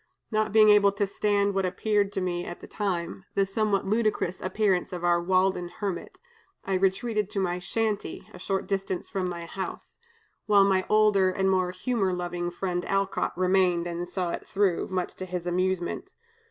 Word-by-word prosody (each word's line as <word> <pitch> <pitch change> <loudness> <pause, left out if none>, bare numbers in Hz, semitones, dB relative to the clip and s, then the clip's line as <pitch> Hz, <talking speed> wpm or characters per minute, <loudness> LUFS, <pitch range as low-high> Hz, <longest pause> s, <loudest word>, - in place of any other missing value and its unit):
Not 215 -1 +1
being 215 0 +6
able 205 -1 +6
to 200 0 0
stand 200 0 +1
what 195 0 0
appeared 200 +2 +1
to 190 - -1
me 175 -1 -1
at 175 - -7
the - - -10
time 190 -2 -3
the 195 - +3
somewhat 200 0 0
ludicrous 210 -3 0
appearance 195 -1 +1
of 180 -1 -5
our 175 0 +3
Walden 185 0 +1
hermit, 190 -2 -5 0.5
I 195 - -1
retreated 195 +3 +1
to 210 -2 -3
my 180 -1 -1
'shanty,' 215 +3 -2
a 180 - -11
short 195 +1 -2
distance 195 -2 -3
from 185 -2 -2
my 170 -1 -5
house; 190 +3 -7 0.5
while 205 -2 +6
my 190 -1 +2
older 210 -3 +4
and 190 +1 +1
more 185 -1 +2
humor 190 +1 -1
loving 175 -1 -3
friend 175 0 -3
Alcott 195 -2 -1
remained 185 -2 +2
and 175 0 -4
saw 180 -2 -2
it - - -4
through, 195 -3 +1
much 185 -1 -2
to 185 - -5
his 180 -1 -4
amusement. 180 0 -1
190 Hz, 180 wpm, -27 LUFS, 180-200 Hz, 0.5 s, being